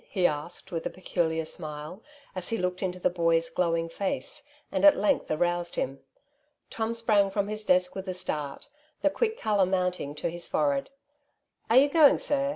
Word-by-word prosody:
'' - - -30
he 185 -3 0
asked 170 +5 -2
with 165 -2 -3
a - - -4
peculiar 165 -3 -1
smile, 155 +3 -5 0.3
as 185 -1 -5
he 225 - 0
looked 180 -1 -2
into 185 -2 -2
the - - +2
boy's 165 -1 +1
glowing 165 -1 0
face, 195 - -4 0.3
and - - -1
at 300 -1 +8
length 285 - +1
aroused 175 +2 0
him. 135 +1 -2 0.7
Tom 225 +1 -2
sprang 215 -4 +3
from 200 +1 -1
his 215 0 -2
desk 180 -2 +2
with 190 0 -6
a - - -1
start, 150 -5 -4 0.4
the 295 - +4
quick 450 +5 -1
colour 205 -4 +2
mounting 180 -6 -1
to 150 - -3
his 175 0 -6
forehead. 140 -2 0 0.4
" - - -45
Are 230 - +5
you 275 +2 +7
going, 295 -1 +6
sir 275 -1 0
180 Hz, 190 wpm, -28 LUFS, 165-215 Hz, 0.7 s, at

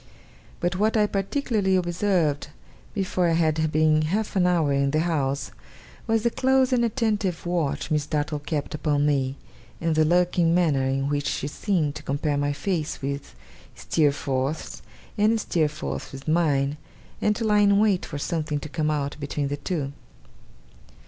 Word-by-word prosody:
But 175 +1 -1
what 215 +3 +2
I 210 - +4
particularly 200 -1 0
observed, 175 -4 +1 0.5
before 185 -2 0
I - - +2
had 160 -1 +1
been 155 0 +3
half 205 +9 -1
an 180 -2 +3
hour 165 -5 +2
in 140 0 +2
the 155 +2 +1
house, 140 -5 -1 0.6
was 225 -1 +2
the 235 - +2
close 265 +1 +2
and 240 -1 +3
attentive 215 -7 0
watch 160 -4 -1
Miss 150 -1 +1
Dartle 150 -1 -1
kept 145 0 -3
upon 145 -1 +1
me; 135 -2 +1 0.4
and 165 -1 0
the 155 0 +4
lurking 175 0 +3
manner 150 -7 +2
in 135 +1 0
which 145 0 -1
she 145 - -2
seemed 155 -2 0
to - - -8
compare 145 +1 -1
my 145 0 0
face 155 0 -2
with 140 +1 -4 0.4
Steerforth's, 140 -1 -1 0.4
and 220 +2 +3
Steerforth's 150 - -2
with 135 +2 -10
mine, 150 -3 +2 0.4
and 210 0 +2
to 230 - -2
lie 210 -1 +4
in 200 -1 +5
wait 205 -3 +3
for 145 - -6
something 155 -1 -2
to 155 - -7
come 155 0 -1
out 145 -2 -1
between 145 0 -2
the 145 - -2
two. 140 -2 -3
155 Hz, 160 wpm, -25 LUFS, 145-190 Hz, 0.6 s, in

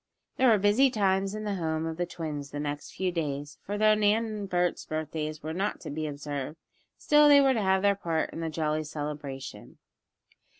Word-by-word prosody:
There 260 -1 +5
were 220 - +6
busy 205 +7 +4
times 195 -3 +1
in 215 - -5
the 205 -1 -2
home 160 -2 -1
of 160 0 -4
the 175 0 -1
twins 150 -5 -5
the 145 - -6
next 145 0 -5
few 185 -1 -1
days, 145 -3 -4
for 205 +1 -4
though 215 0 +5
Nan 215 +2 +3
and 210 -3 -5
Bert's 180 -1 0
birthdays 155 -1 -4
were 160 +1 -4
not 195 +4 -2
to - - -6
be 155 +1 -3
observed, 145 +1 -5 0.4
still 295 0 +5
they 285 -1 +8
were 270 -1 +4
to 225 - 0
have 190 0 +2
their 200 0 +5
part 165 -5 -2
in - - -7
the 165 -1 -2
jolly 155 0 -1
celebration. 145 -3 -6
165 Hz, 205 wpm, -28 LUFS, 150-205 Hz, 0.4 s, they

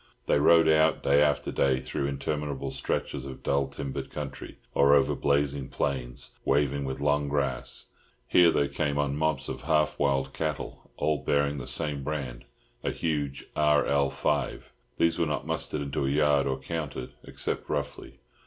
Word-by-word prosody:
They - - +3
rode 80 +2 +6
out, 80 0 +4
day 70 +1 +4
after 75 -1 +2
day, 65 -1 +2
through 65 +1 -3
interminable 70 0 -3
stretches 70 0 -3
of 65 -1 -9
dull 70 -1 +1
timbered 70 0 -5
country, 75 -3 -7 0.2
or 70 +1 +5
over 70 - +3
blazing 70 -1 0
plains 65 -2 -3
waving 70 0 +1
with 65 0 -4
long 70 0 +1
grass. 70 -3 -2 0.4
Here 90 -1 +6
they 70 -3 +2
came 70 0 -1
on 70 -1 0
mobs 75 -3 0
of - - -5
half 75 0 +1
wild 70 -2 +1
cattle, 80 -2 -4
all 75 -1 +1
bearing 70 0 +1
the 65 - -7
same 75 -4 -1
brand, 65 -5 -4 0.4
a - - 0
huge 75 -4 -2
RL5. 70 -1 +1 0.3
These 85 0 +2
were 85 - +2
not 75 - -2
mustered 75 - -2
into 70 -1 -2
a - - +1
yard 70 -1 +3
or 65 -1 0
counted, 70 -2 -5
except - - -4
roughly. - - -4
70 Hz, 160 wpm, -28 LUFS, 70-75 Hz, 0.4 s, rode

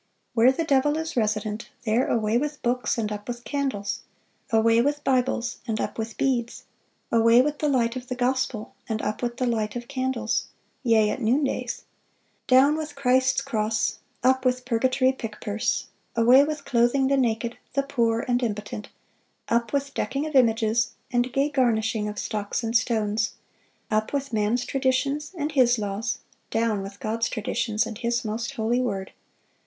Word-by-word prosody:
Where 240 +2 +6
the 295 +5 -1
devil 290 0 +2
is 320 0 -4
resident,... 215 -1 -1 0.2
there 230 +4 +2
away 220 -1 +1
with 295 +3 -1
books, 245 +1 0
and 215 -2 -1
up 205 0 -6
with 240 -1 -5
candles; 265 -9 -2 0.5
away 225 0 +4
with 290 +3 0
Bibles, 250 -2 +1
and 220 -1 -1
up 210 - -3
with 225 0 -4
beads; 245 -3 -1 0.5
away 230 +1 +6
with 295 +1 -2
the 300 - +1
light 240 -3 +1
of 255 -1 -6
the 250 - -3
gospel, 250 -3 -1 0.2
and 220 -1 -1
up 215 - -2
with 240 -1 -2
the 255 - 0
light 220 -3 -1
of 240 0 -5
candles, 260 -3 -1 0.3
yea, 220 -4 +3
at - - -3
noondays;... 265 +5 0 0.6
down 265 +4 +6
with 305 -2 -5
Christ's 260 -1 +2
cross, 215 -1 -1 0.2
up 260 +1 +3
with 255 -1 +1
purgatory 255 +2 +2
pick 225 -5 -7
purse;... 210 +1 -1 0.3
away 245 +4 +7
with 295 -1 -3
clothing 240 +2 +3
the 275 - +3
naked, 235 -2 0
the 275 - +1
poor, 235 -5 +1
and 245 0 +1
impotent, 210 -2 -4 0.6
up 235 0 +1
with 280 -1 -1
decking 280 +2 -2
of 310 - -5
images 230 -3 +3 0.2
and 245 +1 +1
gay 275 +3 +2
garnishing 225 -6 +1
of 210 0 -5
stocks 210 +3 -2
and 225 +1 -2
stones; 225 -2 +1 0.6
up 215 +3 0
with 275 -2 -2
man's 220 +3 +1
traditions 275 +3 0
and 300 0 -1
his 250 -4 +4
laws, 210 +2 -2 0.3
down 225 -3 0
with 195 +1 -8
God's 225 +1 -1
traditions 215 0 -1
and 225 -1 -7
His 235 0 -1
most 230 +5 -3
holy 235 +1 +1
word.... 195 -6 -3
240 Hz, 170 wpm, -25 LUFS, 220-265 Hz, 0.6 s, away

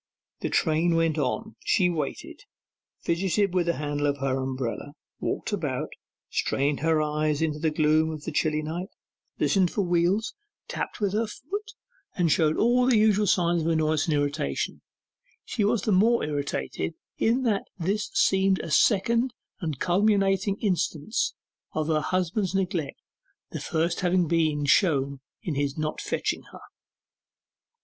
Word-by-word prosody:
The - - -2
train 165 +1 +2
went 165 -1 +1
on. 220 - -2
She 185 -4 +3
waited, 160 -5 -4 0.6
fidgeted 190 +3 +1
with 180 -2 +1
the 170 - +3
handle 145 0 -1
of 140 0 0
her 135 -1 0
umbrella, 130 +1 -4 0.3
walked - - -3
about, - - -2 0.4
strained 140 +1 0
her 160 +1 +2
eyes 150 0 0
into 155 -2 -1
the 160 - +1
gloom 155 +1 +2
of 155 -2 -6
the 160 - -4
chilly 155 0 0
night, 170 +4 -4 0.5
listened 190 -3 +3
for 200 - -1
wheels, 180 +6 +1 0.3
tapped - - -4
with 200 -2 +1
her 220 +2 +1
foot, 405 - -6 0.4
and 170 -4 +2
showed 155 0 +3
all 245 +2 +3
the 250 -4 +5
usual 210 -1 +3
signs 175 -2 +2
of 160 - -2
annoyance 155 -2 +2
and 155 - +2
irritation: 145 - -1 0.6
she 210 - -1
was 205 0 +1
the 215 - +1
more 225 +5 +4
irritated 145 +2 -3 0.2
in 240 +4 +2
that 215 -5 +1
this 195 +4 -1
seemed 190 0 +3
a - - -6
second 235 - +3 0.2
and 160 -8 -3
culminating 195 +1 +2
instance 185 -1 0 0.4
of 155 - -1
her 155 -1 +2
husband's 185 +3 -1
neglect 180 -7 -1 0.5
the - - -5
first 165 +1 -1
having 180 -1 +2
been 155 -3 +1
shown 140 -3 +2 0.2
in 170 - -2
his 140 0 -1
not 155 0 -2
fetching - - -2
her. - - -12
170 Hz, 150 wpm, -26 LUFS, 150-195 Hz, 0.6 s, the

